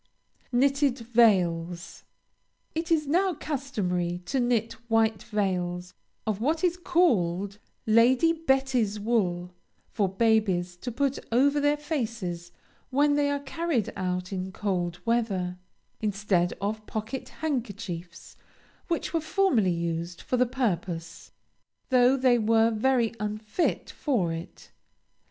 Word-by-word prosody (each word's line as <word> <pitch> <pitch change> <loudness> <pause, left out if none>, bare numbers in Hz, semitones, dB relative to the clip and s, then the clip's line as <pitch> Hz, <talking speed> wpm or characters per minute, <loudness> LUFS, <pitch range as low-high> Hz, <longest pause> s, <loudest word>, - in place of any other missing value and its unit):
KNITTED 275 +1 +2 0.2
VEILS. 175 -6 +2 0.7
It 325 +1 -3
is 310 -2 +3
now 360 +5 +2
customary 180 - -2
to 265 +8 -1
knit 235 -2 +1 0.2
white 225 -2 +2
veils 180 -4 -2 0.3
of 215 -1 -2
what 315 +7 0
is 355 -1 +3
called 205 - +1 0.3
Lady 245 +8 +5
Betty's 265 -9 +1
wool, 180 -5 0 0.4
for 200 -4 +1
babies 190 -4 +1
to 245 +7 -5
put 275 +3 0
over 280 +5 +4
their 290 +1 +2
faces 225 - -4 0.4
when 290 +2 +3
they 290 0 +2
are 285 0 -1
carried 285 - -1
out 180 0 -2
in 185 0 -3
cold 180 -4 -2
weather, 195 -6 0 0.4
instead 195 -4 0
of 215 +2 -3
pocket 220 +4 -4
handkerchiefs, 205 - -5 0.5
which 340 0 -2
were 330 - +1
formerly 315 - +2
used 170 0 -2
for - - -1
the 250 0 +3
purpose, 185 -9 -3 0.6
though 255 0 +5
they 250 -2 +4
were 225 +1 +3
very 235 +1 +2
unfit 215 - -2
for 205 - 0
it. 165 +1 -9
225 Hz, 120 wpm, -27 LUFS, 180-270 Hz, 0.7 s, Lady